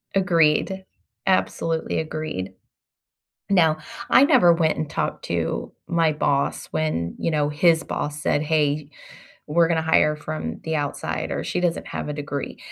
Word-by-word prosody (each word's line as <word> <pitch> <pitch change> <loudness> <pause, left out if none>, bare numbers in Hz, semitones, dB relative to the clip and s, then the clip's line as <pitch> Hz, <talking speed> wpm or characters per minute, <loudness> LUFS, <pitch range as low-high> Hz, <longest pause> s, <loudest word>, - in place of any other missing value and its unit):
Agreed, 185 +1 +2 0.4
absolutely 165 -4 0
agreed. 155 -11 -4 1.0
Now, 165 -5 +4 0.3
I 270 - +7
never 175 -10 +6
went 165 -2 +1
and 155 -1 -3
talked - - -3
to - - -2
my 165 -2 +2
boss 140 -2 0
when, 85 - -2
you - - -1
know, 150 -2 +1
his 160 +2 +3
boss 150 0 -4
said, 145 - +1
"Hey, 150 -1 0 0.6
we're 165 +2 +3
gonna 165 -1 +1
hire 150 -1 +3
from 80 - -5
the 160 0 -2
outside," 145 -2 -3
or, - - -2
"She 180 - -2
doesn't 175 -2 -1
have - - -5
a - - -2
degree," 145 -1 -5
155 Hz, 145 wpm, -23 LUFS, 145-165 Hz, 1.0 s, I